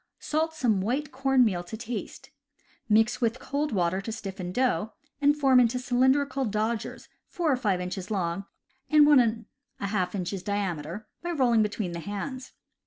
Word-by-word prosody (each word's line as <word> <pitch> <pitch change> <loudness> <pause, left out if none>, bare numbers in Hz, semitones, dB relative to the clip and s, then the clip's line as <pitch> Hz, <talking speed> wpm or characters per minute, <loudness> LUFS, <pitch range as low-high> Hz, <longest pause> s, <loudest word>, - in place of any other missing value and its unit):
— - - -52
Salt 320 +1 +1
some 230 -10 +1
white 270 +8 -1
corn 265 -1 +3
meal 180 -5 0
to 200 +5 -7
taste. 235 0 -6 0.6
Mix 220 +3 +3
with 230 +1 +1
cold 290 +2 -2
water 185 -1 0
to 225 - -5
stiff 200 -3 -6
dough, 225 -3 0 0.3
and 290 +1 +4
form 270 -3 +5
into 245 0 +3
cylindrical 265 +2 +2
dodgers 220 0 -2 0.2
four 340 -4 0
or - - +4
five 205 -7 0
inches 180 +1 -5
long 190 -2 -2 0.4
and 300 -1 +7
one 295 -2 +7
and 225 -1 +1 0.3
a - - -3
half 185 -2 -1
inches 185 0 -3
diameter, 195 -1 -3
by 345 - -4
rolling 250 -9 +3
between 210 -3 -2
the 170 - -5
hands. 255 - -6
225 Hz, 175 wpm, -27 LUFS, 195-265 Hz, 0.6 s, and